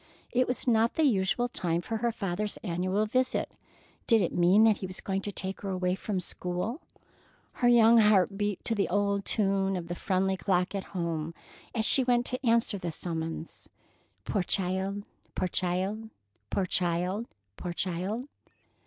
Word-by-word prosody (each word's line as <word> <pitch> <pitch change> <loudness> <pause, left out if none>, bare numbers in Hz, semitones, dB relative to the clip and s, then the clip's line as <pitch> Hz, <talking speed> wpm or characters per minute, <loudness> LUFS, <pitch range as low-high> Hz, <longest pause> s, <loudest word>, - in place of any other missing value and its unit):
It 250 +1 +2
was 250 - -2
not 230 -2 +3
the 320 - +2
usual 240 -1 +2
time 170 -8 -1
for 225 +6 -3
her 235 +2 0
father's 200 0 -3
annual 185 +2 0
visit. 255 +4 0 0.6
Did 225 -4 +5
it - - -1
mean 180 +5 +5
that 220 -2 +5
he 190 - -5
was 185 - -7
going 195 0 -2
to 205 - -4
take 190 0 -5
her 200 - -4
away 180 -1 0
from 200 +2 -4
the 185 - 0
school? 180 - -3 0.8
Her 245 - +5
young 235 -1 +7
heart 210 -2 +4
beat 205 -1 -2
to 230 - +1
the 205 -3 0
old 200 +1 +1
tune 195 -2 +1
of 170 -2 -5
the - - -1
friendly 190 +1 0
clock 180 0 +1
at 195 -1 -3
home 165 -1 -2 0.4
as 220 -1 +1
she 265 - +5
went 245 -1 +2
to 255 +1 -4
answer 230 -3 +2
the 175 - -3
summons: 165 0 -5 0.6
"Poor 200 - 0
child! 190 +2 -1 0.3
Poor 185 - 0
child! 190 +5 -2 0.4
Poor 195 - 0
child! 180 +5 0 0.3
Poor 175 - -5
child!" 185 +8 -2
195 Hz, 170 wpm, -29 LUFS, 180-220 Hz, 0.8 s, young